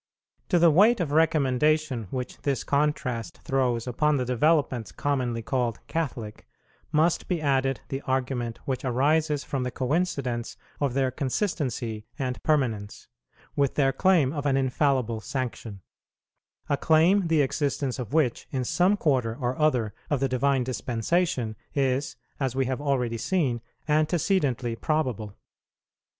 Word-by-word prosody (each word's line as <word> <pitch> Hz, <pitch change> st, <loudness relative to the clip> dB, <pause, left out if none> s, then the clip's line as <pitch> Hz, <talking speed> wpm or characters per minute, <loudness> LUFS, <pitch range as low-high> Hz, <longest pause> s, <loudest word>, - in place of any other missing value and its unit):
To 180 Hz, -, +4 dB
the 170 Hz, -1 st, +6 dB
weight 210 Hz, +9 st, +5 dB
of 165 Hz, -5 st, -1 dB
recommendation 150 Hz, -4 st, +2 dB
which 125 Hz, +2 st, -5 dB
this 140 Hz, -3 st, -1 dB
contrast 140 Hz, -5 st, -1 dB
throws 125 Hz, -4 st, 0 dB
upon 145 Hz, +4 st, +1 dB
the 125 Hz, -, -1 dB
developments 130 Hz, -2 st, +1 dB
commonly 125 Hz, -5 st, -1 dB
called 120 Hz, -2 st, -1 dB
Catholic, 120 Hz, -10 st, -4 dB, 0.4 s
must 160 Hz, +2 st, +2 dB
be 180 Hz, -3 st, 0 dB
added 135 Hz, -4 st, +1 dB
the 135 Hz, 0 st, -3 dB
argument 125 Hz, -3 st, -1 dB
which 130 Hz, -2 st, -2 dB
arises 145 Hz, +4 st, +1 dB
from 135 Hz, -, -3 dB
the 125 Hz, -, -1 dB
coincidence 130 Hz, -3 st, -2 dB, 0.2 s
of 140 Hz, -3 st, 0 dB
their 135 Hz, -2 st, +1 dB
consistency 125 Hz, -, -2 dB
and 130 Hz, -3 st, -3 dB
permanence, 115 Hz, -9 st, -1 dB, 0.5 s
with 140 Hz, -2 st, +1 dB
their 135 Hz, -2 st, +3 dB
claim 160 Hz, -3 st, +3 dB
of 145 Hz, -2 st, -2 dB
an 135 Hz, -1 st, +2 dB
infallible 130 Hz, -4 st, +1 dB
sanction, 120 Hz, -6 st, -5 dB, 0.9 s
a 145 Hz, -, +1 dB
claim, 170 Hz, +5 st, +4 dB
the 160 Hz, -3 st, +3 dB
existence 140 Hz, -1 st, -1 dB
of 120 Hz, -4 st, -5 dB
which, 145 Hz, -6 st, +1 dB
in 130 Hz, -2 st, -2 dB
some 180 Hz, +10 st, +2 dB
quarter 130 Hz, -, +1 dB
or 125 Hz, -1 st, -1 dB
other 125 Hz, -9 st, +2 dB, 0.2 s
of 145 Hz, -, +1 dB
the 135 Hz, -, +1 dB
Divine 130 Hz, +1 st, +1 dB
Dispensation, 125 Hz, 0 st, -1 dB, 0.2 s
is, 135 Hz, 0 st, 0 dB, 0.2 s
as 135 Hz, -3 st, -1 dB
we 135 Hz, 0 st, +1 dB
have 130 Hz, +2 st, -2 dB
already 125 Hz, -5 st, 0 dB
seen, 130 Hz, -5 st, 0 dB, 0.3 s
antecedently 150 Hz, -, +1 dB
probable. 125 Hz, -8 st, -2 dB
135 Hz, 135 wpm, -26 LUFS, 125-150 Hz, 0.9 s, the